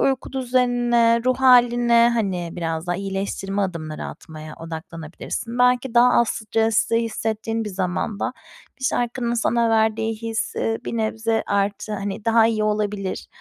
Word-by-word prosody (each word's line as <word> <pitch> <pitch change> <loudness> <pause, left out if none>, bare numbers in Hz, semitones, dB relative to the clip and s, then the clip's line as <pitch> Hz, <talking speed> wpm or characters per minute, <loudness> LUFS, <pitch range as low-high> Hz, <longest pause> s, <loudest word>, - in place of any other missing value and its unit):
uyku 270 -1 0
düzenine, 245 -2 +2
ruh 255 0 +2
hâline, 240 -2 +5
hani, 190 -6 -1
biraz 165 -1 -3
daha 175 - -1
iyileştirme 195 0 -3
adımları 155 -5 -4
atmaya 155 -1 -9
odaklanabilirsin. 165 +8 -6
Belki 250 0 +2
daha 245 +1 +6
az 235 - +3
stresli 225 +1 +1
hissettiğin 225 0 -2
bir 210 - -4
zamanda 190 +5 -2 0.5
bir - - -5
şarkının 240 -1 -1
sana 235 0 +1
verdiği 220 0 +1
his, 225 0 -3
ııı, 225 0 -1
bir 235 - -4
nebze 225 0 0
artı, 200 +1 -1
hani, 200 0 -4
daha 225 0 +5
iyi 215 -2 0
olabilir. 210 -2 -2
225 Hz, 140 wpm, -22 LUFS, 195-235 Hz, 0.5 s, daha